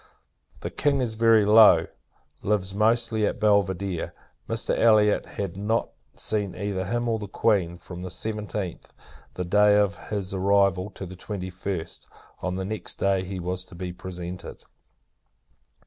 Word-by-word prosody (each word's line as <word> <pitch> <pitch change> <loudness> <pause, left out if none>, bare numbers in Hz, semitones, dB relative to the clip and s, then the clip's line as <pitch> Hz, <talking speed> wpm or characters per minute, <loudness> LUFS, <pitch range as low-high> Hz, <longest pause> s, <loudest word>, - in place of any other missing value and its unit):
The - - -4
King 140 -1 +1
is 120 -4 -1
very 110 -1 +5
low; 110 +1 +7 0.6
lives, 100 -2 0
mostly, 110 +1 +2
at - - -3
Belvidere. 100 -4 +1 0.4
Mr. - - 0
Elliot 105 -2 +4
had 100 -4 -5
not 105 +4 -1 0.3
seen 105 -3 -2
either 100 -2 -2
him 120 +5 -1
or 115 -1 0
the 105 - -6
Queen, 95 -4 +1
from 90 +1 -9
the 90 - -5
seventeenth, 105 -2 -4 0.4
the 90 - -3
day 105 +3 +5
of 100 -1 0
his 100 -2 -3
arrival, 95 0 +2
to 95 - -8
the 95 0 -9
twenty 95 0 -6
first. 90 -2 -5 0.3
On 90 0 -2
the 95 0 -3
next 110 +1 -4
day, 95 -1 +1
he 95 0 -5
was 90 +1 -3
to 90 - -14
be 90 0 -5
presented. 90 0 -7
100 Hz, 150 wpm, -26 LUFS, 95-105 Hz, 0.6 s, low